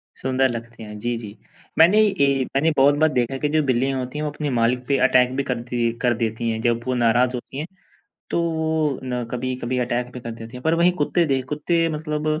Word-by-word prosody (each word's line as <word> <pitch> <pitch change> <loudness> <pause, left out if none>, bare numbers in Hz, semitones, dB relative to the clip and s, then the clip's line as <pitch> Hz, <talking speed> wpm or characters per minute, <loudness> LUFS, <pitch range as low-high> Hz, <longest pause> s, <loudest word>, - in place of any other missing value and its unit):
सुंदर 130 0 +1
लगते 115 -1 -7
हैं 105 -1 -8
जी, 120 +1 -2
जी। 105 -2 -9 0.4
मैंने 175 +7 +6
यही 140 -10 +2
मैंने 160 +4 +3
बहुत 140 +2 +5
बार 155 0 +4
देखा 125 +1 0
है 135 - -4
कि 150 - 0
जो 155 +1 +2
बिल्लियाँ 130 +1 0
होती 125 +3 -5
हैं 150 - -2
वो 150 - -2
अपने 150 0 -3
मालिक 125 +1 +1
पे 140 - +2
अटैक 125 0 +3
भी 140 - 0
करती 120 -2 -1
कर 120 -1 +3
देती 115 0 -2
हैं, 110 0 -2
जब 120 0 +1
वो 130 - +1
नाराज़ 120 +1 +3
होती 130 +2 -8
हैं 155 +4 -4 0.6
तो 160 -4 0
ना 125 -1 -3
कभी-कभी 125 0 -3
अटैक 125 0 -1
भी 125 - -7
कर 115 - -6
देती 115 +2 -9
हैं। 125 - -9
पर 160 +1 +2
वहीं 175 +2 +4
कुत्ते 170 +4 +2
दे 135 -2 +1
कुत्ते 165 +3 +1
मतलब 150 -1 -3
130 Hz, 225 wpm, -22 LUFS, 120-150 Hz, 0.6 s, मैंने